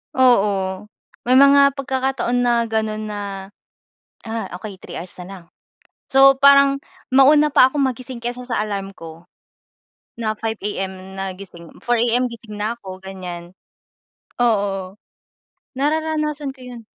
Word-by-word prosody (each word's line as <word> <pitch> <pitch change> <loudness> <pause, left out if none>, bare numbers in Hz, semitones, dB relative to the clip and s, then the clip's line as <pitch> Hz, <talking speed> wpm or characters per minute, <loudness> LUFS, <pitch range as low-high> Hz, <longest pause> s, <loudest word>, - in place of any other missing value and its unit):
Oo, 200 -6 +2 0.4
may 255 - +4
mga 280 0 +6
pagkakataon 265 -2 -1
na 240 -1 +2
gano'n 220 -1 -2
na, 205 0 -5 1.1
ah, 225 0 -4
okey 205 -1 -8
3 - - -8
hours 180 +1 -6
na - - -10
lang, 185 -3 -10 0.6
so 270 0 +6
parang 280 0 +6 0.3
mauna 295 +2 +5
pa 255 - +6
akong 280 0 0
magising 255 -1 -5
kaysa 245 +1 -5
sa 215 -3 -1
alarm 195 -2 -5
ko 165 +1 -12 0.9
na 215 -1 -2
5 225 -1 -3
AM 190 -1 -5
na 195 -1 -4
gising, 175 -3 -12
4 240 -1 +1
AM 240 +2 +1
gising 225 -2 -10
na 230 +3 -2
ako 190 -3 -10
ganiyan. 180 -2 -8 0.9
Oo, 200 -3 0 0.8
nararanasan 305 -1 -1
ko 265 - -20
'yun. 245 -2 -10
230 Hz, 135 wpm, -20 LUFS, 195-265 Hz, 1.1 s, mga